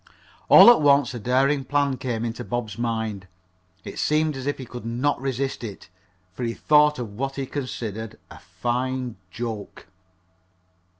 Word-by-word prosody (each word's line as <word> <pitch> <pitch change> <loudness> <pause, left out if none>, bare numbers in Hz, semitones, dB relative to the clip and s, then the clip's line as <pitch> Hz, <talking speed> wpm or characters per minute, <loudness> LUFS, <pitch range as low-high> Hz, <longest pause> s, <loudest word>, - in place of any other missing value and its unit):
All 240 - +10
at 240 - +3
once 140 -3 +4
a 120 - -5
daring 135 +5 +2
plan 140 0 +1
came 120 -3 -3
into 120 +1 -4
Bob's 120 -4 -4
mind. 110 -5 -3 0.6
It - - -8
seemed 155 0 +1
as 135 0 -6
if 145 - -1
he 130 - -7
could 120 0 -9
not 125 +4 -1
resist 135 -1 -2
it, 100 -5 -8 0.4
for 125 - -9
he 115 -1 -2
thought 150 0 +4
of 115 -5 -6
what 135 +5 -3
he 135 - -3
considered 115 -6 -5
a - - -11
fine 120 +6 -3
"joke." 110 0 -6
125 Hz, 160 wpm, -24 LUFS, 115-135 Hz, 0.6 s, All